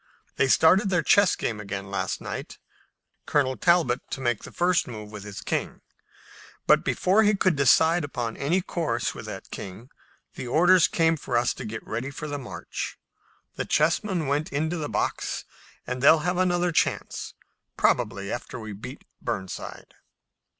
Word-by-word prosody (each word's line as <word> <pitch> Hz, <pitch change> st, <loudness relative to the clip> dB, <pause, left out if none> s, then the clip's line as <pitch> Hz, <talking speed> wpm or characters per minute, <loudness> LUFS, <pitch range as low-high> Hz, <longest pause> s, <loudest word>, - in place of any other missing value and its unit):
They 135 Hz, -, +3 dB
started 185 Hz, +9 st, +5 dB
their 175 Hz, -3 st, +2 dB
chess 200 Hz, -2 st, +5 dB
game 110 Hz, -2 st, -3 dB
again 100 Hz, -1 st, -6 dB
last 95 Hz, -1 st, -2 dB
night, -, -, -6 dB, 0.7 s
Colonel 130 Hz, -3 st, +2 dB
Talbot 170 Hz, -8 st, +3 dB
to -, -, -4 dB
make 120 Hz, -4 st, 0 dB
the -, -, -10 dB
first 175 Hz, 0 st, +1 dB
move 105 Hz, -3 st, -8 dB
with 105 Hz, -2 st, -8 dB
his 105 Hz, -1 st, -8 dB
king, -, -, -3 dB, 0.8 s
but -, -, +5 dB
before 195 Hz, +4 st, +3 dB
he 210 Hz, -1 st, +4 dB
could 185 Hz, -3 st, +2 dB
decide 160 Hz, +5 st, +4 dB
upon 120 Hz, -6 st, -3 dB
any 170 Hz, +7 st, +1 dB
course 150 Hz, -10 st, -2 dB
with -, -, -9 dB
that -, -, -8 dB
king 105 Hz, +7 st, -8 dB, 0.4 s
the 125 Hz, -, -6 dB
orders 175 Hz, +6 st, +5 dB
came 165 Hz, -1 st, +2 dB
for 125 Hz, -4 st, -1 dB
us 120 Hz, +1 st, +2 dB
to -, -, -8 dB
get 110 Hz, 0 st, -6 dB
ready 120 Hz, +5 st, -3 dB
for 145 Hz, +2 st, -6 dB
the 145 Hz, -1 st, -4 dB
march. 125 Hz, -, -6 dB, 0.6 s
The -, -, -2 dB
chessmen 165 Hz, +2 st, +1 dB
went 145 Hz, +6 st, -1 dB
into 160 Hz, +4 st, -1 dB
the 150 Hz, -2 st, -3 dB
box, -, -, -2 dB, 0.4 s
and 125 Hz, 0 st, -4 dB
they'll 155 Hz, +3 st, +6 dB
have 180 Hz, 0 st, 0 dB
another 180 Hz, -1 st, +2 dB
chance, -, -, -1 dB, 0.4 s
probably 100 Hz, +1 st, +1 dB
after 120 Hz, -, -5 dB
we 110 Hz, -2 st, -7 dB
beat 125 Hz, +8 st, -9 dB, 0.2 s
Burnside." 100 Hz, -6 st, -5 dB
145 Hz, 165 wpm, -26 LUFS, 115-175 Hz, 0.8 s, they'll